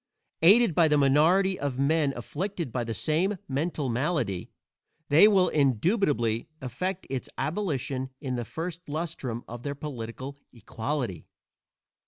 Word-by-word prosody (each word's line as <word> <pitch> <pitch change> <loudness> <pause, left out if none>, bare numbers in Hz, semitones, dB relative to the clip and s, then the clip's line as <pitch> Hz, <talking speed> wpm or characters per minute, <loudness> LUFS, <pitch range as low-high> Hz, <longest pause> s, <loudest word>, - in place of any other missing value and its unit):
Aided 200 +4 +6
by 165 0 +5
the 150 -1 +3
minority 165 +8 +4
of 140 -3 -2
men 145 +1 +2
afflicted 175 - -4
by 125 0 -1
the 115 0 -4
same 170 - +1
mental 145 +1 -2
malady, 120 - -1 0.6
they 155 +8 +8
will 190 -4 +4
indubitably 135 - +1
effect 180 +9 -4
its 135 -2 -4
abolition 140 -7 -2
in 130 -3 -3
the 120 - -2
first 165 +6 -6
lustrum 145 -7 -4
of 120 0 -8
their 140 +2 -4
political 135 0 -7
"equality." 115 - -4
145 Hz, 130 wpm, -27 LUFS, 125-170 Hz, 0.6 s, they